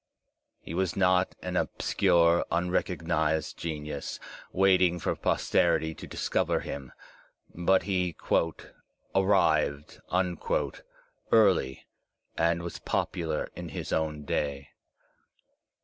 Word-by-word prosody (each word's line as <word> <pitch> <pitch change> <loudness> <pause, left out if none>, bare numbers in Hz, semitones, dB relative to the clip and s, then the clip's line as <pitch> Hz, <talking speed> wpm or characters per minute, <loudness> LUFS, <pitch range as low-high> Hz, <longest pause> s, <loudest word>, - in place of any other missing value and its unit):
He - - -8
was 95 -1 0
not 90 -1 +2
an - - -3
obscure, 85 0 +3
unrecognized 85 -2 0
genius, 75 -3 -5 0.3
waiting 95 -2 +4
for 85 - -1
posterity 80 0 +1
to - - -10
discover - - 0
him, 70 -2 -6 0.6
but 95 +2 +2
he 90 -3 -1 1.0
"arrived" 80 -7 +2 1.3
early 95 -12 +3 0.5
and 85 +1 +1
was 85 - -6
popular 80 -3 -2
in - - -6
his - - -5
own 75 -2 -1
day. 70 -1 -2
85 Hz, 90 wpm, -28 LUFS, 75-90 Hz, 1.3 s, waiting